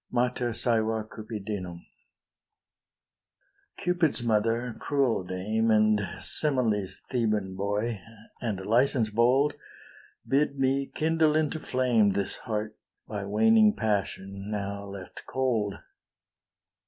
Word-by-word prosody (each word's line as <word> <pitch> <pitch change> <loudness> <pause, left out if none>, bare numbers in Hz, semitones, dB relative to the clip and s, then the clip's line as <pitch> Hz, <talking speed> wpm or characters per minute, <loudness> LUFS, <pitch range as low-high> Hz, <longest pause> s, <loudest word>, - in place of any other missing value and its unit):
MATER 125 0 0
SAEVA 110 -1 +1
CUPIDINUM 105 -5 -6 1.9
Cupid's 170 -7 0
mother, 115 +2 +1
cruel 135 -8 +1
dame, 105 +5 -1
And 110 -1 +4 0.2
Semele's 110 -10 +1
Theban 105 -6 0
boy, 105 +2 -2 0.4
and 100 -5 -3
Licence 120 0 +2
bold, 125 +6 +3 0.7
Bid 140 +1 +1
me 135 +1 +1
kindle 160 -1 +1
into 155 0 +1
flame 120 -8 +2
This 100 0 -2
heart, 110 -2 -4 0.3
by 105 -2 -4
waning 215 - +4
passion 100 -2 -2
now 100 -1 -4
left 100 -2 -9
cold. 115 -7 0
110 Hz, 95 wpm, -28 LUFS, 105-130 Hz, 1.9 s, And